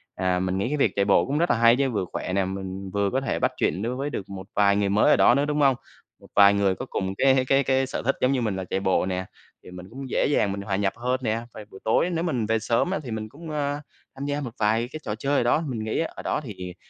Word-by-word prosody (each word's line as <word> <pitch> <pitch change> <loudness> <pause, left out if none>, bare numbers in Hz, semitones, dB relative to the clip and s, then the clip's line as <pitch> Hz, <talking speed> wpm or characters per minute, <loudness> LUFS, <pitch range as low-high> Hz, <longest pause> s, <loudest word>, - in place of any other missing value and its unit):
À, 90 -1 0
mình 95 0 -1
nghĩ 100 - -1
cái 150 +4 -1
việc 140 - +2
chạy 100 - +2
bộ - - +4
cũng 140 +2 -1
rất 170 +2 +1
là - - +3
hay 115 0 +6
chứ 135 0 +1
vừa 105 -5 -1
khỏe 90 - -3
nè, 95 0 +1
mình 95 0 -5
vừa 100 -1 +1
có 135 - 0
thể - - -2
bắt 130 - +1
chuyện 95 - 0
đối 120 +4 -2
với 140 +3 -3
được 100 -9 -6
một 95 -1 -8
vài 100 -1 +4
người 100 -1 +1
mới 105 +2 +3
ở - - +7
đó 120 - +5
nữa, 140 - +2
đúng 150 0 0
hông? 135 -2 +5 0.4
Một - - -17
vài 100 0 +7
người 100 -2 +2
có - - -6
cùng 95 -1 -2
cái 135 -1 +4
cái 135 +1 +3
cái 130 0 +1
sở - - -4
thích 135 - +2
giống 130 - +3
như 135 -2 +1
mình 110 -4 -1
là 95 - -3
chạy 95 - -2
bộ 95 -1 +1
nè, 95 0 -2 0.4
thì - - -12
mình 90 +1 -10
cũng 135 +2 -8
dễ - - +1
dàng 105 -8 +2
mình 100 0 -4
hòa 100 -1 -2
nhập 95 0 0
hơn 125 +2 -1
nè, 115 0 0
và 110 - -9
buổi 95 - -11
tối 115 +10 +2
nếu 170 -2 -1
mình 130 -10 -1
về 110 +1 +1
sớm 115 - 0
á 195 - -1
thì 125 - -7
mình 110 -1 -4
cũng, 160 +7 -11
ơ, 145 -1 -2 0.4
tham 135 +1 -5
gia 145 +1 -2
một 125 -5 -5
vài 110 +2 +1
cái 155 - -6
trò 105 - -3
chơi 140 +5 0
ở - - +2
đó, 120 +6 +2
mình 115 -5 -3
nghĩ 110 - -2
ở 165 - -3
đó - - -1
thì 125 -8 -7
hiện 90 -1 -6
115 Hz, 310 wpm, -25 LUFS, 100-135 Hz, 0.4 s, ở